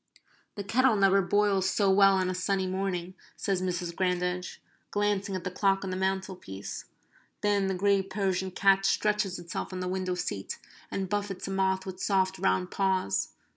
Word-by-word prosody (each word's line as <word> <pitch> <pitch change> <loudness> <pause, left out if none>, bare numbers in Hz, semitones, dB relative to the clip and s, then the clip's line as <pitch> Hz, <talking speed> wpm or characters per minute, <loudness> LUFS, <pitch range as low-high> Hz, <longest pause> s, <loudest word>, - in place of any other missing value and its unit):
"The 205 - -4
kettle 245 +4 +3
never 195 -1 +4
boils 195 0 +2
so 195 0 +2
well 195 0 +6
on 185 -1 +1
a 185 - -1
sunny 190 +1 0
morning," 185 -1 -2 0.2
says 195 -2 -1
Mrs. 175 -2 -2
Grandage, 180 -1 -1 0.3
glancing 205 -1 0
at 185 - -4
the 185 - -3
clock 195 +1 +1
on 190 - -3
the - - -2
mantelpiece. 190 - -3 0.6
Then 205 -2 +2
the 190 - 0
grey 200 +1 +3
Persian 190 -1 -1
cat 195 +1 +3
stretches 210 -1 +1
itself 175 +2 -5
on 185 - -4
the 180 - -2
window 185 0 -1
seat, 100 - -4 0.3
and 195 -1 -2
buffets 200 -1 -3
a - - -3
moth 190 -1 +1
with 185 -1 -7
soft 190 -1 +1
round 185 -1 +1
paws. 190 - 0
190 Hz, 175 wpm, -29 LUFS, 185-195 Hz, 0.6 s, well